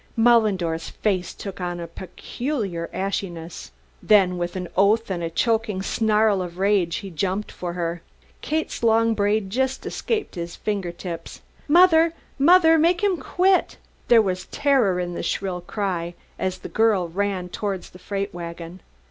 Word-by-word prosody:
Mullendore's 205 -8 +2
face 190 -4 -1
took 195 -2 -7
on 175 -1 -3
a 170 - -4
peculiar 190 - -5
ashiness. 175 -4 -4 0.3
Then 190 -4 +4
with 175 +1 -3
an 180 -1 -4
oath 205 +3 +3
and 175 -2 -2
a 165 - -2
choking 220 +1 0
snarl 215 -2 +2
of 175 -1 -6
rage 190 -3 +2
he 195 -2 -6
jumped 190 +5 -2
for 175 -1 -5
her. 170 -1 -3 0.4
Kate's 315 +1 -2
long 230 0 +3
braid 205 -1 0
just 265 +3 -1
escaped 435 -3 -2
his 170 -1 -6
finger 200 -5 -3
tips. 170 -1 -8 0.3
"Mother! 330 0 +5 0.3
Mother! 325 +2 +6
Make 345 +4 +2
him 390 -3 +2
quit!" 370 +3 +1 0.3
There 230 -2 +6
was 185 -2 -3
terror 255 -11 +2
in 175 -1 -3
the - - -4
shrill 185 -2 -2
cry 175 -3 -3 0.2
as 185 0 -1
the - - -8
girl 215 -5 +2
ran 190 0 -2
towards 195 0 -4
the 180 - -14
freight 200 +1 -4
wagon. 170 +1 -7
195 Hz, 155 wpm, -23 LUFS, 175-225 Hz, 0.4 s, Mother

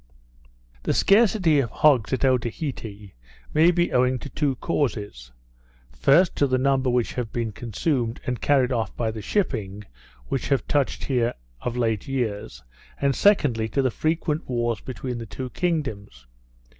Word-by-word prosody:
The - - -1
scarcity 195 -7 +4
of 125 -5 0
hogs 130 -4 +3
at 130 0 +1
Otaheite 120 - -2 0.4
may 160 +3 +5
be 175 0 +1
owing 125 +1 +3
to 140 - -8
two 140 -1 -1
causes; 105 - -3 0.6
first, 140 - +3
to 140 - +3
the 130 -1 +1
number 135 0 +2
which 125 -1 0
have 120 -3 -4
been 115 -2 -2
consumed, 120 +2 -2
and 125 -3 -3
carried 135 -3 +3
off 115 -3 -2
by 115 -2 -1
the 110 -1 -7
shipping 105 - -2 0.4
which 135 - -2
have 135 -3 +1
touched 145 -2 0
here 125 -3 0 0.3
of 125 0 -3
late 115 -4 0
years; 110 - -3 0.4
and, 140 -1 +1
secondly, 130 - +3
to 135 +5 0
the 130 - +1
frequent 155 +2 -1
wars 120 -3 -1
between 125 -1 -5
the 115 - -7
two 130 +4 -6
kingdoms. 110 - -3
125 Hz, 155 wpm, -24 LUFS, 115-145 Hz, 0.6 s, may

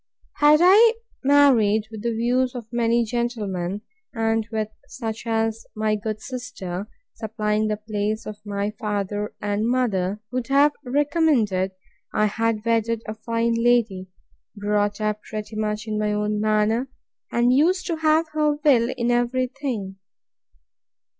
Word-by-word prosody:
Had 300 +2 +6
I 440 +6 +7 0.3
married 245 -7 +4
with 220 -2 -7
the 235 - -1
views 250 +3 +1
of 240 -3 -6
many 235 0 +2
gentlemen, 210 -5 -2 0.3
and 225 -1 0
with 220 -1 -2 0.2
such 225 -2 -6
as 225 0 0
my 215 0 0
good 215 0 -4
sister 215 -7 -6 0.3
(supplying 215 -1 -1
the 210 0 -1
place 215 +1 -3
of 210 0 -8
my 205 0 -2
father 210 -1 -3
and 205 +2 -1
mother,) 210 -6 0
would 250 -2 -2
have 285 +2 +4
recommended, 255 - +1 0.4
I 215 - +3
had 220 +1 -1
wedded 230 0 +1
a 215 - -4
fine 230 +1 -1
lady, 230 -5 +1 0.5
brought 205 0 0
up 215 0 -1
pretty 215 0 -7
much 215 0 -2
in 215 -1 -2
my 210 0 0
own 210 0 -1
manner, 215 +4 +1 0.4
and 240 +1 +3
used 355 +7 +3
to 335 -3 -2
have 315 +1 +3
her 305 -1 +1
will 260 -5 +3
in 240 0 +1
every 245 +1 +1
thing. 245 -8 -5
225 Hz, 140 wpm, -23 LUFS, 210-250 Hz, 0.5 s, I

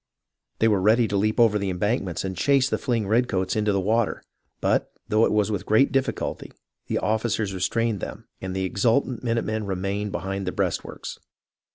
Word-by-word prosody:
They 115 - +3
were 105 -4 +3
ready 110 +4 +4
to 100 - -2
leap 110 +4 +1
over 110 -3 +5
the 100 -1 -1
embankments 95 -1 -1
and 95 0 -3
chase 135 +8 +3
the - - -1
fleeing 115 -6 -1
redcoats 100 -5 +1
into 105 -1 +1
the 100 - +1
water; 110 +3 0 0.4
but, - - +1 0.2
though 110 +2 +4
it - - 0
was 105 0 +2
with 100 - -3
great 110 +6 +4
difficulty, 135 0 -2 0.4
the - - 0
officers 110 -2 0
restrained 105 +4 0
them, - - -7
and 95 0 -4
the 95 - -1
exultant 115 +6 +1
minute 115 -1 0
men 110 0 -2
remained 100 +2 -2
behind 95 +1 -3
the - - 0
breastworks. - - -3
105 Hz, 185 wpm, -25 LUFS, 95-115 Hz, 0.4 s, over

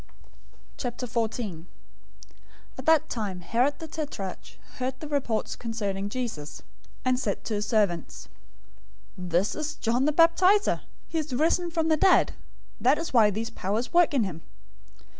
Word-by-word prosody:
014:001 230 -7 -3 1.1
At 260 - -9
that 320 -2 +5
time, 200 -6 -4
Herod 250 +10 +1
the 320 - -7
tetrarch 290 - -6 0.2
heard 260 +1 -2
the 305 - -6
report 270 -7 -1
concerning 205 -4 -3
Jesus, 210 -12 -5
014:002 - - -28 0.4
and 255 0 +2
said 205 -6 -2
to 225 - -3
his 210 0 -1
servants, 200 -7 0 0.9
"This 180 +2 0
is 305 -1 -3
John 245 +3 +1
the 300 - +3
Baptizer. 360 +6 +4 0.3
He 325 - -1
is 300 -3 -4
risen 335 +5 +2
from 325 -1 0
the 315 - +4
dead. 380 +4 +4 0.5
That 265 +4 +4
is 330 -2 -4
why 220 -4 +6
these 220 +3 -3
powers 210 - -2
work 345 -4 +4
in 250 - +3
him." 170 -5 -5
245 Hz, 145 wpm, -27 LUFS, 205-305 Hz, 1.1 s, why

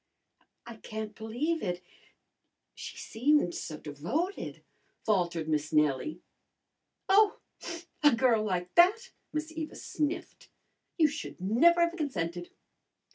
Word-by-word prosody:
"I 235 -1 -9
can't 215 -1 -6
believe 245 +10 -2
it. 175 0 -2 0.9
She - - -8
seemed 245 -5 +2
so 155 - -5
devoted," 195 - -3 0.4
faltered 175 -6 +1
Miss 150 -1 0
Nellie. 150 - +1 0.9
"Oh, 405 +2 +5 0.6
a 295 -1 +7
girl 230 -2 +3
like 180 -3 -2
that!" 425 +8 +5 0.2
Miss 310 +1 -3
Eva 320 -1 -5
sniffed. 300 +2 -4 0.5
"You 320 -3 +6
should 300 -7 -6
never 255 - +4
have 340 0 +2
consented." 175 - -3
230 Hz, 110 wpm, -30 LUFS, -, 0.9 s, a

